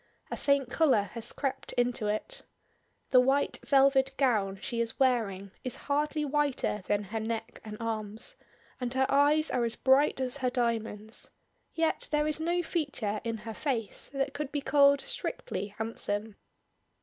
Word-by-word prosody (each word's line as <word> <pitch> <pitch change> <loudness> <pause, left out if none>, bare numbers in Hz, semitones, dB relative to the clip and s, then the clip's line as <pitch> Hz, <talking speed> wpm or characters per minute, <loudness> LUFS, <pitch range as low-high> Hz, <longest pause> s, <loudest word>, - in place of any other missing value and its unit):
A - - -1
faint 280 -2 +2
color 255 - +3
has 230 0 -4
crept 275 -2 -3
into 245 -3 0
it. 215 - -3 0.7
The 255 - +8
white 270 +3 +2
velvet 270 -1 +4
gown 210 -8 +2
she 235 +3 -2
is 230 -1 -2
wearing 210 -7 +1
is 255 - -3
hardly 300 +1 0
whiter 285 -7 0
than 205 0 +1
her 215 +3 -4
neck 225 +1 -4
and 210 -1 -7
arms, 220 -2 -3 0.4
and 250 -1 -2
her 265 0 +3
eyes 295 +3 +4
are 250 -2 +1
as 230 -1 -1
bright 265 +2 +3
as 260 +1 -1
her 255 -2 0
diamonds; 225 -3 -2 0.5
yet 325 -1 +1
there 300 0 +2
is 305 0 -1
no 345 +2 0
feature 275 - -2
in 230 -1 -2
her 225 - -4
face 230 -4 -2
that 275 0 -1
could 285 -1 -4
be 290 - -1
called 280 0 +5
strictly - - -4
handsome. 220 -1 -2
255 Hz, 160 wpm, -30 LUFS, 220-285 Hz, 0.7 s, The